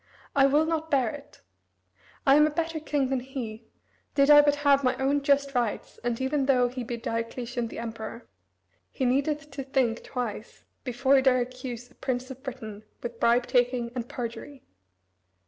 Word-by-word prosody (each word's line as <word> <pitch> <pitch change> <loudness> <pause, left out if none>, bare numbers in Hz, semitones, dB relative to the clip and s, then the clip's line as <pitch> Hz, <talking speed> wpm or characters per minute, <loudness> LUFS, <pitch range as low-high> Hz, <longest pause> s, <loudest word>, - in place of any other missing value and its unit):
I 275 -1 +6
will 295 +3 +3
not 320 0 -2
bear 260 -7 +2
it. 290 -1 -12 0.8
I 275 - +6
am 300 +1 +6
a - - 0
better 325 +1 -2
king 290 -3 -1
than 265 -1 0
he, 240 -4 -7 0.5
did 280 +1 +5
I 295 0 +10
but 290 0 +3
have 280 -1 +5
my 255 - +2
own 275 +2 +1
just 280 0 +2
rights, 240 -4 -2
and 240 -1 -1
even 265 +1 0
though 250 -3 +4
he 250 0 -5
be 240 0 -4
Diocletian 230 +1 -3
the - - -9
Emperor, 230 0 -6 0.6
he 265 - -2
needeth 285 +4 0
to 275 0 -5
think 260 -4 0
twice 235 -4 -5 0.2
before 265 +2 +3
he - - +4
dare 260 -1 +4
accuse 245 -1 -6
a - - -20
prince 255 0 -3
of 260 0 -10
Britain 220 -6 -7 0.2
with 240 -1 -6
bribe 240 +1 +3
taking 245 -2 +1
and 245 -1 -5
perjury." 250 +3 -6
260 Hz, 180 wpm, -27 LUFS, 240-280 Hz, 0.8 s, I